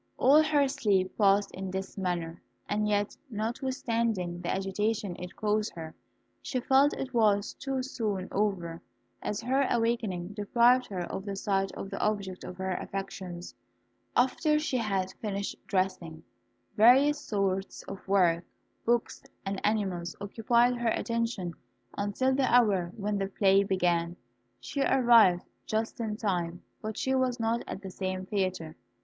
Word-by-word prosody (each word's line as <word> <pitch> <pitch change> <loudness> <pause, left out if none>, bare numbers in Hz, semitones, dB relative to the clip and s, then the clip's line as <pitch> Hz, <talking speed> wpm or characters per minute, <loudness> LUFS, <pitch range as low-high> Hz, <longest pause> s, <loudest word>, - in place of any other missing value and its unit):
All 290 +4 +6
her 295 -2 +3
sleep 205 -9 +1
passed 200 -1 +3
in 190 0 -5
this 190 +1 -5
manner, 175 -4 -3 0.3
and 210 0 0
yet, 205 0 0
notwithstanding 225 -5 -2
the - - -4
agitation 200 0 -1
it 180 0 -8
caused 215 0 0
her, 160 -1 -7 0.5
she 255 - -2
felt 270 +3 +4
it 265 -1 -5
was 210 -3 +2
too 270 -1 -3
soon 210 -7 -3
over, 185 -5 -1 0.4
as 210 +1 -3
her 260 +3 +1
awakening 225 -7 0
deprived 235 +5 +3
her 190 -3 -4
of 185 +2 -4
the 200 -1 -3
sight 195 0 0
of 195 - -7
the - - -4
object 200 -3 -1
of 180 - -8
her 190 0 -2
affections. 185 -2 -6 0.6
After 285 +5 +3
she 300 -4 0
had 195 -5 -1
finished 200 -2 -3
dressing, 185 -4 -1 0.5
various 270 +7 +6
sorts 195 -6 -2
of 195 0 -9
work, 180 -4 +3 0.4
books, 235 0 0 0.2
and 195 0 -3
animals 190 -5 -1
occupied 235 +4 +2
her 240 -1 +1
attention 230 -7 -1 0.4
until 205 +6 0
the 265 -1 +1
hour 200 -8 +4
when 205 -1 -1
the 195 - -1
play 195 0 +4
began. 175 -3 +1 0.4
She 280 - -4
arrived 235 -10 +5 0.2
just 220 +2 -2
in 215 -2 -2
time, 175 -5 -2 0.2
but 215 0 -5
she 265 - 0
was 255 -2 +1
not 230 +1 0
at 195 - -6
the 190 - -6
same 185 0 -3
theatre. 185 -5 -2
205 Hz, 145 wpm, -29 LUFS, 185-235 Hz, 0.6 s, All